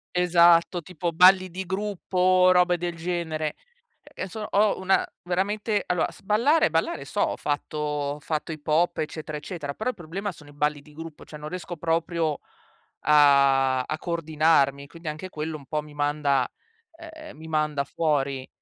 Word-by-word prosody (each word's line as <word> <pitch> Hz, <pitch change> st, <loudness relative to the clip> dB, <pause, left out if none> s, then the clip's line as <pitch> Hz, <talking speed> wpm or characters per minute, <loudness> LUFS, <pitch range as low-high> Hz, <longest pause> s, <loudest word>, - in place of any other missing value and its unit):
Esatto, 175 Hz, 0 st, +4 dB
tipo 175 Hz, 0 st, -4 dB
balli 185 Hz, +2 st, +6 dB
di 190 Hz, +2 st, -5 dB
gruppo 195 Hz, 0 st, -4 dB
o 185 Hz, 0 st, +5 dB
robe 180 Hz, -1 st, +4 dB
del 175 Hz, 0 st, -3 dB
genere. 160 Hz, -2 st, -3 dB, 0.5 s
Che 185 Hz, -, -7 dB
so 215 Hz, +4 st, -7 dB
ho 205 Hz, +1 st, +2 dB
una 190 Hz, +1 st, +2 dB, 0.2 s
veramente, 205 Hz, +4 st, -1 dB
allora, 180 Hz, -1 st, 0 dB
s -, -, -16 dB
ballare 235 Hz, -, +3 dB
ballare 165 Hz, -4 st, -1 dB
so, -, -, -2 dB
ho -, -, +1 dB
fatto 145 Hz, +1 st, -3 dB
ho 150 Hz, -1 st, -2 dB
fatto 155 Hz, +2 st, -3 dB
hip 155 Hz, -2 st, -9 dB
hop, 170 Hz, +3 st, +2 dB
eccetera, 155 Hz, 0 st, -4 dB
eccetera, 150 Hz, -2 st, -6 dB
però 220 Hz, -, -2 dB
il -, -, -19 dB
problema 190 Hz, +4 st, -5 dB
sono 150 Hz, -3 st, -15 dB
i -, -, -15 dB
balli 150 Hz, 0 st, -1 dB
di 150 Hz, 0 st, -18 dB
gruppo, 165 Hz, 0 st, -10 dB
cioè 150 Hz, -, -10 dB
non 150 Hz, +1 st, -7 dB
riesco 180 Hz, -1 st, -6 dB
proprio 165 Hz, -1 st, -1 dB, 0.7 s
a 140 Hz, -3 st, +5 dB
a 155 Hz, -, -4 dB
coordinarmi, 155 Hz, -4 st, +1 dB
quindi 165 Hz, +2 st, -12 dB
anche 155 Hz, +5 st, -6 dB
quello 155 Hz, -1 st, -4 dB
un 140 Hz, -, -15 dB
po' 150 Hz, +2 st, -1 dB
mi 150 Hz, 0 st, -14 dB
manda 145 Hz, -3 st, +1 dB, 0.5 s
ehm, 320 Hz, -, -11 dB
mi 160 Hz, -, -10 dB
manda 155 Hz, -2 st, 0 dB
fuori. 140 Hz, -3 st, -1 dB
160 Hz, 170 wpm, -25 LUFS, 150-180 Hz, 0.7 s, balli